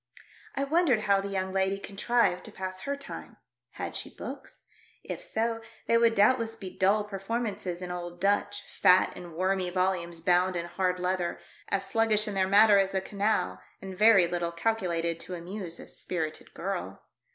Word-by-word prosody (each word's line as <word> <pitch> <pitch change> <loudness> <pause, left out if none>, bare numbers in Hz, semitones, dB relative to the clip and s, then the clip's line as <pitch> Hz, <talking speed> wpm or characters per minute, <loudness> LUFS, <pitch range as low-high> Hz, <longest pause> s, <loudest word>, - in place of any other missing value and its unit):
I 275 - 0
wondered 280 -6 +3
how 200 -2 +3
the 200 - -4
young 190 -1 -2
lady 190 0 +1
contrived 200 -1 0
to - - -9
pass 185 0 -6
her 280 +8 -3
time. 280 - -9 0.4
Had - - -5
she - - -4
books.'* - - -9 0.4
If - - -5
so, 230 - -1 0.2
they 230 - +2
would 230 -1 +4
doubtless 225 +2 +3
be 185 -2 -9
dull 200 +3 +3
performances 200 -3 -3
in 180 - -5
old 175 0 -6
Dutch, 205 +1 +1
fat 185 -1 +4
and 175 -2 -9
wormy 185 +1 0
volumes 180 -2 -1
bound 180 +2 +3
in 170 0 -2
hard 180 +1 -1
leather 180 -1 -1 0.2
— - - -21
as 195 0 0
sluggish 220 -1 +2
in 210 - -3
their 190 -1 +1
matter 205 +1 +7
as 195 0 0
a - - +3
canal, 195 - -1 0.2
and 190 -1 -8
very 205 -2 +6
little 170 0 -2
calculated 170 -3 -1
to 180 - -6
amuse 175 0 -6
a - - -10
spirited 160 -3 -3
girl. 195 +2 -4
190 Hz, 175 wpm, -29 LUFS, 180-215 Hz, 0.4 s, matter